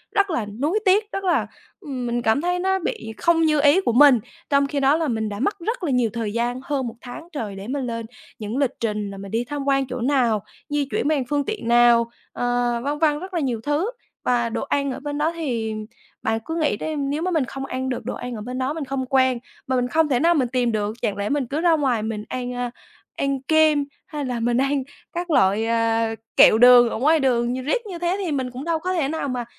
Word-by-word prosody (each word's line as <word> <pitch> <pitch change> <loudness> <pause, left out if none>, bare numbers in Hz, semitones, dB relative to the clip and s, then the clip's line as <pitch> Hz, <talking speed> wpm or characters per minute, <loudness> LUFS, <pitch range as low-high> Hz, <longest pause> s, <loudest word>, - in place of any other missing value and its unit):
rất 400 -1 +3
là 245 -10 -1
nuối 285 - -1
tiếc, 415 +3 +3
rất 390 - -4
là, 310 - +1 0.3
ừm, 270 - -5
mình 240 0 -1
cảm 225 +5 +2
thấy 355 +1 0
nó 380 +1 +1
bị 220 -10 -4
không 335 -1 +3
như 310 -2 +3
ý 295 +6 +5
của 240 - 0
mình. 270 -1 +7 0.3
Trong 280 -1 +3
khi 285 0 -2
đó 275 +2 +4
là 325 -1 -1
mình 220 -4 -1
đã 205 0 -6
mất 400 +9 -1
rất 430 +3 -3
là 300 - 0
nhiều 250 -3 +2
thời 220 -3 -3
gian, 240 +2 -1
hơn 270 -3 -2
1 230 - -7
tháng 250 +6 -9
trời 220 - -5
để 195 +2 -8
mình 270 0 -2
lên 230 -1 -4 0.3
những 215 +3 -4
lịch 275 -2 +1
trình 210 -3 -2
là 195 - -8
mình 195 0 -8
đi 230 +2 0
tham 285 +1 -4
quan 275 -1 +2
chỗ 255 0 -5
nào, 240 -6 +2 0.3
di 290 -1 0
chuyển - - 0
bằng 300 -3 +1
phương 290 -1 0
tiện 430 - -4
nào, 235 -1 +5 0.2
ờ, 245 -1 0
vân 290 +1 -1
vân 300 -2 +2
rất 375 +1 -8
là 340 - 0
nhiều 255 -6 -1
thứ. 300 - 0 0.3
Và 235 -2 +1
đồ - - -3
ăn 280 -1 0
ở - - -5
bên 290 0 -4
đó 310 +2 +1
thì 235 -9 -2 0.5
bạn 225 0 0
cứ 325 - -4
nghĩ 305 -10 +1
đi, 315 +6 -3
nếu 285 +2 -2
mà 365 +2 -1
mình 310 -6 +1
không 270 +2 -6
ăn 260 0 -3
được 250 - -4
đồ - - -3
ăn 245 -1 -6
ở 215 - -6
bên 250 +3 -5
đó, 260 +2 -1
mình 315 -2 -4
không 265 0 -3
quen, 260 -1 +2 0.3
mà 260 - 0
mình 250 -1 +1
không 315 +3 +2
thể 250 - +2
nào 335 +5 +4
mình 270 -6 +1
tìm 245 -1 0
được, 215 0 -2
chẳng 200 - -1
lẽ 200 0 -2
mình 285 -3 0
cứ 290 +6 -2
ra 345 -1 +4
ngoài 260 -8 0
mình 215 -1 -3
ăn, 250 -1 -4
a, 245 -1 -3 0.4
ăn 275 -1 -1
kem 310 0 +3 0.2
hay 295 -2 -4
là 250 -2 -2
mình 235 +1 +1
ăn 275 +1 +1 0.3
các 345 +1 -4
loại, 205 -4 +3
à, 230 -1 +1 0.2
kẹo - - +8
đường 245 0 +8
ở - - -3
ngoài 305 +7 +3
đường 245 -3 +1
nh 255 0 -4
riết 470 - 0
như 370 -5 -7
thế 350 +1 0
thì 335 - -2
mình 260 -3 -2
cũng 255 +3 -7
đâu 335 -1 0
có 365 +3 -2
thể 325 -7 +1
nào 305 -1 -2
mà 245 -2 -3
265 Hz, 260 wpm, -23 LUFS, 235-305 Hz, 0.5 s, kẹo